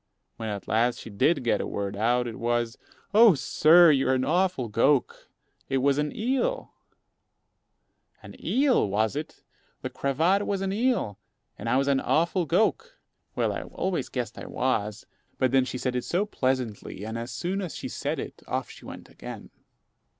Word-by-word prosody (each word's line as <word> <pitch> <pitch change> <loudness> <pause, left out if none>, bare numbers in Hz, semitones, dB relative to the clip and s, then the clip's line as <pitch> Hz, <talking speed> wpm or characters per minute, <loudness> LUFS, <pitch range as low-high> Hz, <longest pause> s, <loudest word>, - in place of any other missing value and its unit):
When 110 -1 -4
at 100 -2 -5
last 120 +2 +2
she 115 - -9
did 140 +9 +2
get 120 - +1
a - - -3
word 100 0 -3
out, 120 +4 +1
it 115 -2 -6
was, 120 0 0 0.4
"Oh! 220 -3 +7
sir, 160 +4 +6
you're 135 -2 +2
an 130 - 0
awful 175 -5 +1
gowk. 125 +5 +1 0.4
It 135 - +1
was 140 +2 +2
an 150 0 0
eel." 270 - -1 1.5
An - - -11
eel, 260 - +2
was 110 +5 0
it! 150 +2 -6 0.4
The - - -4
cravat 165 +9 +1
was 200 -1 -1
an 195 0 -1
eel! 220 - 0 0.4
And 115 - -5
I 130 - +3
was 140 +1 +1
"an 140 -1 +3
awful 170 +4 +1
gowk!" 340 - +1 0.4
Well, - - 0
I - - -4
always 185 -2 -3
guessed 120 -4 -4
I - - -8
was; 105 -5 -1 0.3
but 130 -2 +1
then 130 -1 +4
she 130 - -4
said 125 0 -2
it 125 - -1
so 185 +4 0
pleasantly, 130 - -2
and 110 +1 -5
as 115 +1 -4
soon 185 +7 -3
as 180 -5 -5
she - - -5
said - - -3
it - - -7
off - - -3
she - - -14
went - - -9
again. - - -10
135 Hz, 180 wpm, -26 LUFS, 115-180 Hz, 1.5 s, Oh